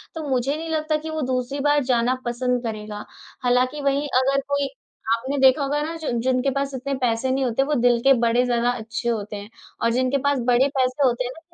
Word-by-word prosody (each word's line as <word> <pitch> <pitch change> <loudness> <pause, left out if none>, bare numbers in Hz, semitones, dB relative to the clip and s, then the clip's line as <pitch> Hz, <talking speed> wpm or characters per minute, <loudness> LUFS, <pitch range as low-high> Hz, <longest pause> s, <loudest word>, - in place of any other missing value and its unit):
तो 315 -2 -5
मुझे 265 +2 0
नहीं 325 +1 -5
लगता 310 -1 0
कि 315 +1 -7
वो 315 0 -3
दूसरी 255 +2 -2
बार 290 0 +2
जाना 250 0 +1
पसंद 245 +1 -1
करेगा। 210 -2 -5 0.4
हालाँकि 255 +4 +1
वहीं 280 +1 0
अगर 275 +1 +1
कोई 280 0 0 0.5
आपने 260 +5 -4
देखा 265 +1 +5
होगा 290 +2 0
ना 325 +2 -4
जो 315 -4 -3
जिनके 255 +2 +1
पास 275 +1 -2
इतने 275 +2 -3
पैसे 245 +1 +1
नहीं 265 +1 0
होते 245 +2 +1
वो 295 +2 -1
दिल 240 -1 +4
के 270 - +6
बड़े 235 +1 +3
ज़्यादा 240 -1 +1
अच्छे 235 0 -3
होते 210 -2 -3
हैं। 205 +1 -8 0.3
और 230 - +2
जिनके 255 +2 +1
पास 285 -2 +2
बड़े 250 +3 +4
पैसे 260 +1 +2
होते 245 0 0
हैं 245 - -4
ना 290 - -12
255 Hz, 220 wpm, -23 LUFS, 240-280 Hz, 0.5 s, के